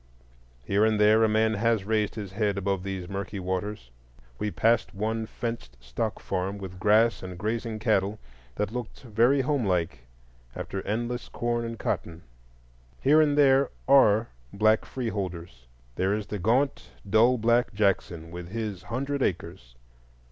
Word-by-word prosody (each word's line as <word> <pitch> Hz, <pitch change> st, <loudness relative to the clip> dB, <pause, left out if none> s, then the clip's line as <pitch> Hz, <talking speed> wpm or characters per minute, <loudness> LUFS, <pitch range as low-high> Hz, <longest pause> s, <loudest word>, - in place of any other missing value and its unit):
Here 100 Hz, -, +2 dB
and 110 Hz, -1 st, +2 dB
there 105 Hz, +2 st, +5 dB
a 110 Hz, -, +4 dB
man 110 Hz, +1 st, +2 dB
has 110 Hz, -1 st, +1 dB
raised 105 Hz, 0 st, 0 dB
his 100 Hz, -4 st, -6 dB
head 100 Hz, 0 st, 0 dB
above 100 Hz, -1 st, -1 dB
these 95 Hz, -2 st, -5 dB
murky 100 Hz, +1 st, -5 dB
waters. 95 Hz, -6 st, -4 dB, 0.5 s
We 105 Hz, -, -1 dB
passed 115 Hz, 0 st, +1 dB
one 110 Hz, +2 st, -2 dB
fenced 115 Hz, -, -6 dB
stock 65 Hz, -, -4 dB
farm 95 Hz, +1 st, -3 dB
with 95 Hz, -2 st, -8 dB
grass 105 Hz, +1 st, +3 dB
and 90 Hz, -1 st, -7 dB
grazing 110 Hz, +3 st, -2 dB
cattle, 105 Hz, -2 st, +1 dB, 0.4 s
that 105 Hz, 0 st, -2 dB
looked 120 Hz, -1 st, -6 dB
very 120 Hz, +4 st, +3 dB
home 135 Hz, -1 st, 0 dB
like 85 Hz, -, -1 dB, 0.5 s
after 95 Hz, -, -4 dB
endless 120 Hz, +3 st, -2 dB
corn 120 Hz, 0 st, -2 dB
and 115 Hz, 0 st, -5 dB
cotton. 85 Hz, -4 st, -3 dB, 0.8 s
Here 150 Hz, +3 st, +5 dB
and 145 Hz, -1 st, +2 dB
there 135 Hz, -1 st, +5 dB, 0.2 s
are 115 Hz, -5 st, +5 dB, 0.2 s
black 110 Hz, +2 st, +3 dB
free 125 Hz, -3 st, -4 dB
holders: 85 Hz, -, -6 dB, 0.3 s
there 95 Hz, +8 st, 0 dB
is 105 Hz, -1 st, -4 dB
the 105 Hz, -, -5 dB
gaunt 125 Hz, +9 st, +1 dB, 0.2 s
dull 115 Hz, +5 st, +4 dB
black 120 Hz, +2 st, +2 dB
Jackson, 95 Hz, -6 st, -1 dB
with 90 Hz, 0 st, -7 dB
his 105 Hz, -3 st, -4 dB
hundred 135 Hz, +6 st, -3 dB
acres. 85 Hz, -, -3 dB
105 Hz, 155 wpm, -27 LUFS, 95-115 Hz, 0.8 s, there